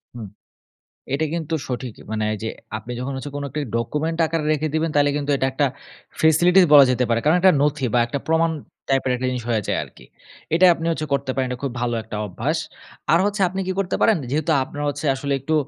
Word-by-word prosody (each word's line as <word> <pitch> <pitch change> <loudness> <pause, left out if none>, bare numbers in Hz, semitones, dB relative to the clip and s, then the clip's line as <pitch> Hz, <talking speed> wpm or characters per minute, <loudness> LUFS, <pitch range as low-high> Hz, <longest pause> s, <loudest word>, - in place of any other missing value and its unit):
হুম। 115 -3 -7 0.9
এটা 145 +3 +1
কিন্তু 165 -1 -3
সঠিকই 125 -2 -6
মানে 110 -1 -1
এইযে 110 +1 -4 0.3
আপনি 110 +3 -7
যখন 135 +2 -3
হচ্ছে 140 +2 -6
কোন 145 - -4
একটা 150 - -3 0.2
document 150 +8 -2
আকারে 160 -1 -2
রেখে 155 +1 0
দিবেন 160 +1 +1
তাইলে 145 0 +4
কিন্তু 145 0 -2
এটা 130 - 0
একটা 140 +2 +1 0.5
facility 175 +4 +5
বলা 145 -2 +10
যেতে 125 0 +1
পারে, 115 -1 +1
কারণ 155 +4 +4
একটা 185 +1 +6
নথি 145 -2 +1
বা - - +5
একটা 130 +4 -3
প্রমাণ 160 +1 +2 0.4
type 135 -1 +1
এর - - +2 0.2
জিনিস 125 -1 -3
হয়ে 110 -3 +1
যায় - - 0
আরকি। - - -17 0.5
এটাই 180 +2 +6
আপনি 165 0 -5
হচ্ছে 155 -2 -2
করতে 140 -1 0
পারেন, 130 -1 0
এটা 125 - -4
খুব 140 - -2
ভালো 120 -1 -1
একটা 110 -1 -7
অভ্যাস। 90 - -2 0.5
আর 165 - +6
হচ্ছে 205 0 -1
আপনি 190 +2 -4
কি 190 - 0
করতে 190 -2 0
পারেন? 220 - +5
যেহেতু 155 +3 0
আপনার 145 +2 -7
হচ্ছে 145 +1 -3
আসলে 140 +1 -3
একটু 155 +5 -1
145 Hz, 215 wpm, -22 LUFS, 125-160 Hz, 0.9 s, বলা